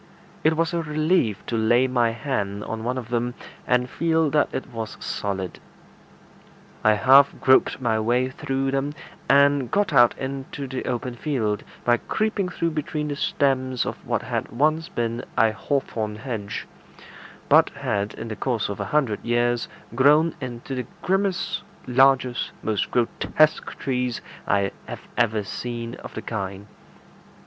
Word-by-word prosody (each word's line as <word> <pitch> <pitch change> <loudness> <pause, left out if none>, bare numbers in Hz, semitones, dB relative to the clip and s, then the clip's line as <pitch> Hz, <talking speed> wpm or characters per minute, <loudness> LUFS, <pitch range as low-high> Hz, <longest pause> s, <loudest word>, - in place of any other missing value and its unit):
It 155 0 +3
was 165 +2 +1
a 170 - +1
relief 155 - +1
to 115 - -3
lay 120 +3 +4
my 125 -2 +2
hand 105 -5 -3
on 110 0 -5
one 125 +2 -1
of 120 -3 -6
them, 120 +1 -1 0.3
and 125 0 +2
feel 160 +2 +1
that 150 -1 +3
it - - -3
was 110 -1 -5
solid. 95 -3 -3 1.2
I 110 - +6
half 135 +6 +5
groped 130 0 +4
my 115 -4 +1
way 120 +4 +1
through 135 -1 -2
them, 135 +2 -1 0.4
and 140 -2 +5
got 200 -5 +1
out 120 -3 +6
into 135 +1 -5
the 130 0 -4
open 125 +1 -2
field, 115 -6 -1 0.2
by 120 0 +4
creeping 215 - -1
through 170 -2 -1
between 150 0 -3
the 145 - -2
stems 130 -3 0
of - - -5
what - - -1
had - - -3
once 155 +7 +1
been 115 +1 -2
a 110 -1 +5
hawthorn 110 -4 -2
hedge, 110 -3 -5 0.8
but - - +6
had 100 0 -2
in 115 - -6
the 110 - -4
course 115 -2 -1
of 100 - -5
a - - -2
hundred 135 -9 0
years 120 0 +1 0.3
grown 150 +6 +5
into 125 +1 -6
the 125 -2 -3 0.2
grimmest, 190 0 0 0.2
largest, 130 -1 +3
most 105 -1 0
grotesque 150 +5 +1
trees 125 -3 -1 0.3
I 100 -1 +2 0.2
have - - -7
ever 110 -3 +2
seen 115 +2 -5
of - - -10
the - - -5
kind. 100 -2 -4
125 Hz, 155 wpm, -24 LUFS, 115-145 Hz, 1.2 s, I